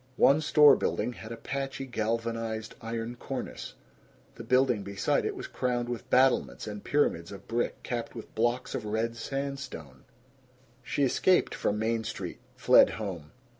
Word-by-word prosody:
One 140 +3 +5
store 150 -2 +7
building 120 +4 -1
had 115 -1 -10
a 115 - -5
patchy 135 +2 -4
galvanized 115 -1 -2
iron 115 +1 -4
cornice; 130 +1 -6 0.6
the - - -9
building 125 -1 +3
beside 100 0 0
it - - -2
was - - -6
crowned 120 -1 -2
with 120 -2 -5
battlements 130 0 +3
and 105 -1 -6
pyramids 85 - +1
of 100 - -10
brick 120 +1 -2
capped 120 -1 -4
with 115 - -9
blocks 120 +3 0
of 120 - -3
red 110 +2 -1
sandstone. 130 - -5 0.8
She 145 - -1
escaped 180 +7 +3
from 105 - -1
Main 110 +1 0
Street, - - -5 0.2
fled - - +6
home. 90 -8 -5
115 Hz, 150 wpm, -29 LUFS, 110-130 Hz, 0.8 s, store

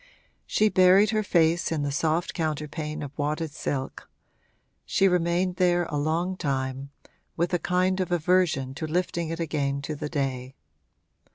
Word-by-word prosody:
She 215 - +3
buried 190 +2 +5
her 215 -1 +1
face 170 -4 +2
in 155 -3 -1
the 145 - -1
soft 160 +4 0
counterpane 155 -1 -3
of 140 -1 -8
wadded 155 +2 -1
silk; 135 -2 -4 0.7
she 195 - +2
remained 180 0 +1
there 175 -1 +3
a 150 - -1
long 165 +5 0
time, 135 -3 -2 0.5
with 170 +2 0
a 175 - +2
kind 185 +2 +1
of 185 -2 -2
aversion 170 -6 +1
to 155 +3 -5
lifting 170 0 -1
it 165 +1 -4
again 145 -4 -1
to 155 - -3
the 150 0 -5
day. 135 -3 -3
160 Hz, 155 wpm, -26 LUFS, 145-180 Hz, 0.7 s, buried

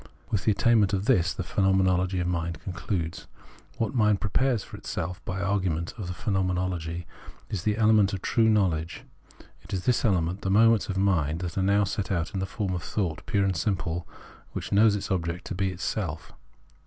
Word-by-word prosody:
With 100 - 0
the 110 - +5
attainment 105 -2 +3
of 100 0 0
this 90 -9 +3
the 90 - -4
Phenomenology 95 -1 +2
of 90 - -1
Mind 85 -1 -2
concludes. 90 -3 -4 0.5
What 115 +1 -1
mind 105 -5 +3
pre 105 - -3
pares 130 -5 +2
for - - -11
itself 90 +2 -5
by 95 - -3
the 100 - -2
argument 90 -5 -1
of 105 -7 -6
the 90 - -3
Phenomenology 90 -4 -1 0.5
is 100 - -2
the 105 +2 0
element 105 -3 +4
of 95 -2 -5
true 115 -1 +3
knowledge. 90 -6 +1 0.4
In 95 - -7
this 125 -2 +2
element 95 -3 +1
the 95 - -2
moments 110 +2 +4
of 95 - -2
mind 85 -4 +1
are 95 - 0
now 100 +2 +3
set 100 -1 -2
out 85 +2 -1
in 95 - -2
the 95 - -2
form 100 -2 -3
of 90 - -2
thought 85 -4 -2
pure 100 -1 +2
and 95 -2 0
simple, 85 -2 -2 0.5
which - - -5
knows 105 +1 +5
its 100 - -4
object 85 -1 -2
to - - -4
be 95 +1 0
itself. 90 -3 -4
95 Hz, 190 wpm, -27 LUFS, 90-105 Hz, 0.5 s, the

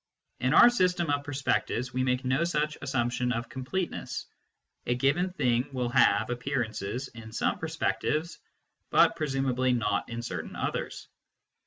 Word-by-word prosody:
In 130 +4 +2
our 240 - +9
system 180 -7 +1
of 145 0 0
perspectives, 135 -3 -1
we 130 - 0
make 125 0 0
no 135 +5 +2
such 150 -3 0
assumption 125 -2 0
of 115 +1 -3
completeness. 155 +8 -4 0.6
A 120 - +2
given 145 +9 +2
thing 125 -7 +1
will 125 -2 -1
have 100 -1 +3
appearances 120 -1 -3
in 115 -1 -11
some 110 - 0
perspectives, 155 +3 -1 0.5
but - - +5
presumably 135 -3 0
not 105 -4 0
in 120 0 -5
certain 120 - -5
others. - - -3
130 Hz, 140 wpm, -28 LUFS, 120-145 Hz, 0.6 s, our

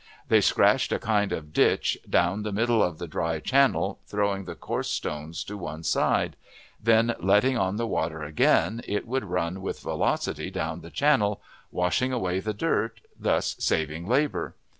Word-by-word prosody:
They - - +5
scratched - - +3
a - - +2
kind 105 -2 0
of 75 -1 -5
ditch - - +3
down 90 +4 +2
the 105 0 -3
middle 115 +2 +2
of 90 -5 0
the 85 - -6
dry 80 +1 -2
channel, 130 - +2
throwing 100 -2 -1
the - - -7
coarser - - -3
stones 75 +2 -4
to 105 - -7
one 80 -2 -6
side; - - +1 0.5
then, 115 +1 +4
letting 105 +8 +3
on 95 -3 0
the 115 +2 -1
water 80 -7 -2
again, 80 +9 +2
it 105 +3 -2
would 130 -1 -1
run 90 0 -2
with 95 - -5
velocity - - -1
down 80 +2 -4
the 85 - -10
channel, 105 - +2 0.3
washing 90 +9 +1
away 95 -7 -1
the 110 +3 -2
dirt, 115 -2 -1 0.2
thus - - 0
saving 80 +2 -1
labor. 140 +5 0
100 Hz, 165 wpm, -26 LUFS, 85-115 Hz, 0.5 s, They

